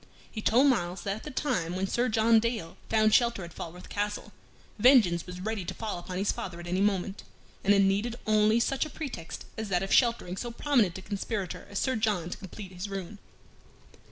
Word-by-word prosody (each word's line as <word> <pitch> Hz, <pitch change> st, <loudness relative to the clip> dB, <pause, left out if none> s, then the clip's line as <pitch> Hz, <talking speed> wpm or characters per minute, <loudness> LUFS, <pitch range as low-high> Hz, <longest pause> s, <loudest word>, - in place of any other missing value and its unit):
He 215 Hz, -, -5 dB
told 240 Hz, +6 st, +4 dB
Myles 185 Hz, -9 st, +1 dB
that 195 Hz, +1 st, -2 dB
at -, -, -11 dB
the -, -, -5 dB
time 250 Hz, -, -1 dB
when 190 Hz, +1 st, 0 dB
Sir 240 Hz, +5 st, 0 dB
John 225 Hz, +1 st, +5 dB
Dale 220 Hz, -7 st, -2 dB
found 215 Hz, -1 st, +3 dB
shelter 235 Hz, -5 st, +3 dB
at 170 Hz, -, -9 dB
Falworth 175 Hz, +2 st, -8 dB
Castle, 205 Hz, 0 st, -3 dB, 0.5 s
vengeance 205 Hz, -9 st, +5 dB
was 180 Hz, 0 st, -7 dB
ready 210 Hz, +1 st, -3 dB
to -, -, -5 dB
fall 215 Hz, -5 st, -4 dB
upon 180 Hz, +1 st, -6 dB
his 200 Hz, +2 st, +1 dB
father 175 Hz, -2 st, -6 dB
at 175 Hz, -, -8 dB
any 180 Hz, +2 st, 0 dB
moment, 195 Hz, -1 st, 0 dB, 0.4 s
and 200 Hz, -, +3 dB
it 200 Hz, -1 st, +6 dB
needed 205 Hz, +5 st, +1 dB
only 215 Hz, +1 st, +4 dB
such 265 Hz, +3 st, +1 dB
a 310 Hz, -, -5 dB
pretext 265 Hz, -, -6 dB
as 220 Hz, -2 st, -4 dB
that 180 Hz, -1 st, +1 dB
of 195 Hz, -, -1 dB
sheltering 230 Hz, -7 st, +3 dB
so 240 Hz, -, -4 dB
prominent 235 Hz, -, +1 dB
a 190 Hz, -, -9 dB
conspirator 200 Hz, -1 st, -4 dB
as 200 Hz, -, -5 dB
Sir 260 Hz, +4 st, +1 dB
John 210 Hz, -6 st, 0 dB
to -, -, -4 dB
complete 190 Hz, 0 st, -9 dB
his 185 Hz, +2 st, -6 dB
ruin. 195 Hz, +1 st, -6 dB
205 Hz, 210 wpm, -29 LUFS, 185-230 Hz, 0.5 s, it